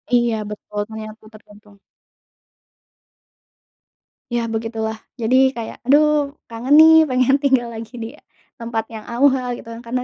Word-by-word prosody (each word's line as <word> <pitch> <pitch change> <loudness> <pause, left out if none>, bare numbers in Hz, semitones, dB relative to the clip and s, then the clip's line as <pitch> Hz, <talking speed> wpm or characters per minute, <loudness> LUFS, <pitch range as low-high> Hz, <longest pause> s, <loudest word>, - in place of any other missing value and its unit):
Iya, 240 -1 +2
betul. 210 0 -7
Ternyata 220 0 -9
tergantung. 210 -1 -18 2.5
Ya 240 -1 0
begitulah. 220 0 -4 0.2
Jadi 260 +2 +2
kayak, 230 -2 -7
aduh, 295 0 +3 0.2
kangen 245 +5 +1
nih 320 0 +7
pengen 255 +1 +2
tinggal 260 -4 +1
lagi 225 +2 -9
di 230 -1 -6 0.5
tempat 230 -1 -3
yang 220 -2 -9
awal 255 +1 +2
gitu 230 - -12 0.2
karena 250 +2 -2
235 Hz, 120 wpm, -20 LUFS, 220-265 Hz, 2.5 s, nih